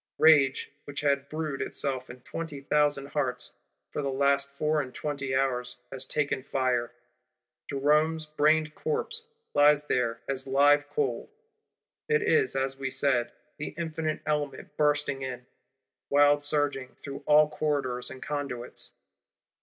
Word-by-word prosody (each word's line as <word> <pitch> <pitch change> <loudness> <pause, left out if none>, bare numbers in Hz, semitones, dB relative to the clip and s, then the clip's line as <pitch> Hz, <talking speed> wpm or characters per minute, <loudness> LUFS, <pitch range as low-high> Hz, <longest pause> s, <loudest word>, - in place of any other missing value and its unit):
Rage, 145 -4 +5
which 145 0 -5
had 140 -1 +1
brewed 155 -3 -3
itself 130 -2 -2
in 125 0 -10
twenty 160 +1 -6
thousand 145 0 +1
hearts, 130 -5 -2 0.4
for - - -2
the 140 - -1
last 140 +1 +2
four 150 +2 0
and 130 -2 -7
twenty 140 -3 -3
hours, 125 -2 0
has 130 0 -7
taken 145 -3 0
fire: 125 -3 0 0.8
Jerome's 150 +3 +2
brained 155 0 +2
corpse 455 - -2 0.3
lies 145 0 +5
there 120 -5 0
as 135 0 -3
live 145 +2 +4
coal. 135 -5 -1 0.8
It 455 -1 +3
is, 445 -2 +2
as 135 0 -1
we 135 -1 -2
said, 120 -3 +1 0.3
the 150 - -5
infinite 160 -2 -2
Element 145 -3 -2
bursting 145 -2 +1
in: 125 -2 -5 0.6
wild 145 0 +5
surging 145 -3 0
through 140 -1 -8
all 150 0 +7
corridors 145 -5 -1
and 130 - -9
conduits. 140 -5 -5
145 Hz, 135 wpm, -28 LUFS, 135-150 Hz, 0.8 s, all